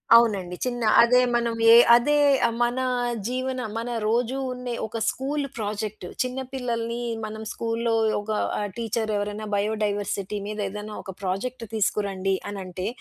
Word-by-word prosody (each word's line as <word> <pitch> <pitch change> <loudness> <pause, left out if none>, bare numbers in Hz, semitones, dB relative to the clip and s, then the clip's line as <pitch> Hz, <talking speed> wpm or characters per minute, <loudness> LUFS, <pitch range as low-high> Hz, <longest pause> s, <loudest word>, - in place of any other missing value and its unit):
అవునండి. 200 -6 +3
చిన్న 245 -1 -2 0.2
అదే 250 +1 +5 0.2
మనం 235 -1 +1
యే 230 - +10 0.2
అదే 295 +5 +3 0.5
మన 240 +2 0 0.5
జీవన 255 0 -2 0.2
మన 235 +2 -3 0.2
రోజు 245 +3 +1
ఉండే 250 -1 -5
ఒక 230 - -5
స్కూలు 280 +2 -2
ప్రాజెక్టు, 210 -2 -4 0.2
చిన్న 255 +1 -4
పిల్లల్ని 235 -2 -2 0.2
మనం 220 0 -6
స్కూల్లో 230 0 -1 0.3
ఒక 215 +1 -5 0.3
ఆహ్, 205 - -1
టీచరెవరైనా 215 -2 -2
బయోడైవర్సిటీ 205 -1 -1
మీదేదైనా 210 0 -4
ఒక 190 - -7
ప్రాజెక్ట్ 230 +6 -3
తీసుకురండి 195 -2 0 0.2
అనంటే, 185 -2 -5
220 Hz, 125 wpm, -25 LUFS, 205-240 Hz, 0.5 s, యే